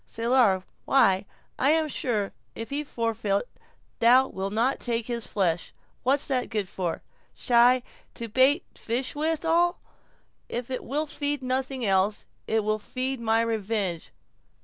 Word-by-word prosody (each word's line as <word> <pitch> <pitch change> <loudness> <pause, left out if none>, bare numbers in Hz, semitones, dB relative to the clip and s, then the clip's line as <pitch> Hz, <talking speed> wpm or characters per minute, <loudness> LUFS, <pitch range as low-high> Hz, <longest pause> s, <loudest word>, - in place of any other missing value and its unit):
"Salar.—Why, 215 -3 +2 0.3
I 270 - +3
am 315 0 +3
sure, 225 -8 -2 0.2
if 225 +2 -7
he 290 +2 -1
forfeit, 225 -6 -1 0.6
thou 250 +3 +6
wilt 190 +1 -4
not 235 +5 +1
take 235 -2 -2
his 235 -2 -3
flesh; 175 -4 -1 0.3
what's 270 +3 +2
that 255 -3 0
good 210 -4 -2
for? 180 -2 -4 0.3
Shy.—To 240 -1 +1
bait 260 - +4
fish 245 +3 -3
withal; 325 +3 +1 0.7
if 240 +2 -4
it 255 - -3
will 295 +5 -1
feed 290 -2 -3
nothing 260 0 -1
else, 195 +1 +1 0.2
it 220 -1 +1
will 215 +1 0
feed 255 +4 -3
my 225 0 +2
revenge." 210 -6 -2
235 Hz, 130 wpm, -26 LUFS, 215-265 Hz, 0.7 s, thou